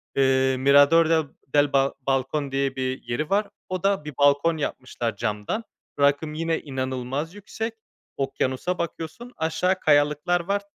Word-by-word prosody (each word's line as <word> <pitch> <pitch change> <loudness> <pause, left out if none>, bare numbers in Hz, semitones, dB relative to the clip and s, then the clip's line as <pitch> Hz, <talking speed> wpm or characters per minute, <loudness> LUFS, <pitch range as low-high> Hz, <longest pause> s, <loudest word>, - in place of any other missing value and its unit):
eee, 130 -1 +3
Mirador 145 +5 +6
del 160 -1 +3 0.2
del 145 +1 +2
Bal 135 0 +3 0.2
Balcón 135 +2 0
diye 135 0 0
bir 130 0 -3
yeri 120 +6 -3
var. 200 +1 +2 0.2
O 185 -1 -3
da 195 -6 +1
bir 150 - -6
balkon 145 +3 +4
yapmışlar 125 -6 -3
camdan. 105 - -2 0.4
Rakım 145 +2 +2
yine 165 +1 -1
inanılmaz 130 +4 -3
yüksek, 220 +3 -5 0.4
okyanusa 135 +5 -1
bakıyorsun, 170 +8 -5
aşağı 180 +4 0
kayalıklar 150 +3 +3
var, 200 +3 -1
145 Hz, 140 wpm, -24 LUFS, 135-165 Hz, 0.4 s, Mirador